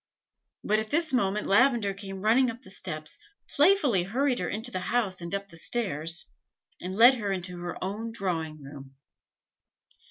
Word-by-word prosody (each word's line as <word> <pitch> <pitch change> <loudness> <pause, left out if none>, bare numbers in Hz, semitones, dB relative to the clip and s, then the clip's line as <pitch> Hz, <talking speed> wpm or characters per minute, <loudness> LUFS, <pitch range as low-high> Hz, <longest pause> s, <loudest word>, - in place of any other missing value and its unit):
But 215 +1 +2
at 220 - -3
this 315 +3 0
moment 210 -4 +1
Lavender 225 -1 +3
came 195 -1 -8
running 245 +4 +4
up 235 +2 -8
the 190 - -11
steps, 155 -5 -6 0.3
playfully 290 - +4
hurried 250 +7 0
her - - -2
into 225 +4 -4
the 185 - -2
house 205 -7 0
and 170 +3 -3
up 200 0 -5
the 165 - -9
stairs, 165 -5 -2 0.6
and 185 +1 -5
led 245 +5 +7
her 205 -2 -2
into 180 -1 -4
her 175 0 -5
own 210 +4 -4
drawing 165 -8 -3
room. 135 -1 -11
200 Hz, 165 wpm, -28 LUFS, 180-240 Hz, 0.6 s, led